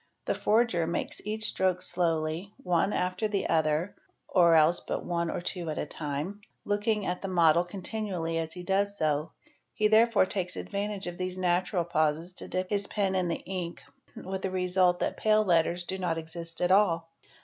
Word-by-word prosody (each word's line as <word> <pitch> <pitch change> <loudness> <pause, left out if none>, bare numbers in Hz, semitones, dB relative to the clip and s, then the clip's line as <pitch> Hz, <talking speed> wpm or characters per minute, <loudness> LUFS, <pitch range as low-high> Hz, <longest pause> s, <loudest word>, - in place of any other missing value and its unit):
The - - +1
forger 215 -7 +2
makes 170 - -3
each 215 +1 -3
stroke 185 -3 0
slowly, 165 +2 -1
on 180 +2 +2
after 180 +4 0
the 205 -2 -1
other 160 +3 +1 0.3
(or 170 -3 +5
else 160 +2 +5
but - - -4
one 170 -1 -1
or - - -3
two 175 -1 -4
at 155 - -3
a - - -1
time) 150 +7 -4 0.2
looking 205 0 0
at 180 0 -2
the 195 - -3
mod 170 -1 +4
continually 185 -4 -2
as 160 0 -3
he 180 - -7
does 200 +2 0
so; 155 -1 0 0.4
he 215 - +3
therefore 220 -1 +5
takes 185 -2 -3
advantage 200 0 -4
of 175 0 -6
these 185 0 -3
natur 180 0 +1
pauses 160 +1 0
to - - -6
dip 185 +1 -3
his 200 -1 0
pen 195 -3 0
in 185 -2 +1
the 170 - -3
ink 180 -2 -5 0.3
with 190 0 -5
the 190 - -1
result 180 -1 +2
that - - -1
pale 215 0 +3
letters 175 0 +2
do 190 +2 -4
1 - - -5
n 165 - 0
exist 165 +1 -7
at 180 0 +2
all. 170 -5 +3
180 Hz, 190 wpm, -29 LUFS, 165-200 Hz, 0.4 s, or